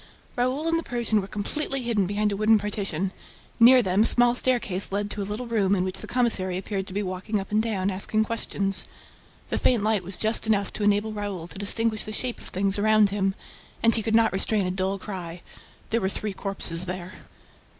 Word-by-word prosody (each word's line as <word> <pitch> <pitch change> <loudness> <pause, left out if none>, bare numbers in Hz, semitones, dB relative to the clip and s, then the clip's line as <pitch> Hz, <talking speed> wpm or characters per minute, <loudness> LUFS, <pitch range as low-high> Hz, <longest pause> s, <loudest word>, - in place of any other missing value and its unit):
Raoul 255 +6 -1
and 330 0 +1
the - - -6
Persian 235 -5 0
were 190 - -7
completely 270 +6 -3
hidden 220 -6 0
behind 205 +1 0
a - - -1
wooden 215 +2 +4
partition. 195 -3 -2 0.5
Near 245 +2 +7
them, 190 +1 +2
a - - +4
small 245 0 +8
staircase 235 -7 -1
led 205 +1 -2
to 210 - -3
a 200 - -5
little 215 +4 -4
room 205 -4 +1
in 180 - 0
which 185 0 -4
the - - -8
commissary 205 -7 +1
appeared 195 0 -4
to 185 - -6
be 205 +1 -1
walking 185 +3 -3
up 195 - -8
and 215 +1 +2
down, 200 -4 -1
asking 210 +3 0
questions. 195 -4 0 0.6
The - - 0
faint 235 -5 +2
light 215 -2 +2
was 185 +2 -5
just 220 +1 0
enough 205 -2 0
to 210 - -4
enable 205 +1 +1
Raoul 205 -5 -4
to 185 - -10
distinguish 215 +2 +1
the 215 - -7
shape 245 +2 -4
of - - -12
things 195 +2 0
around 215 -1 +4
him. 195 -1 0 0.5
And 230 0 +5
he 225 - +3
could 220 +1 0
not 225 -4 +3
restrain 200 +1 +2
a 180 - -1
dull 190 +1 -1
cry: 180 -4 -7 0.5
there 230 +1 +1
were 190 - 0
three 205 +1 -4
corpses 185 -3 -1
there. 185 0 -5
205 Hz, 215 wpm, -25 LUFS, 190-225 Hz, 0.6 s, small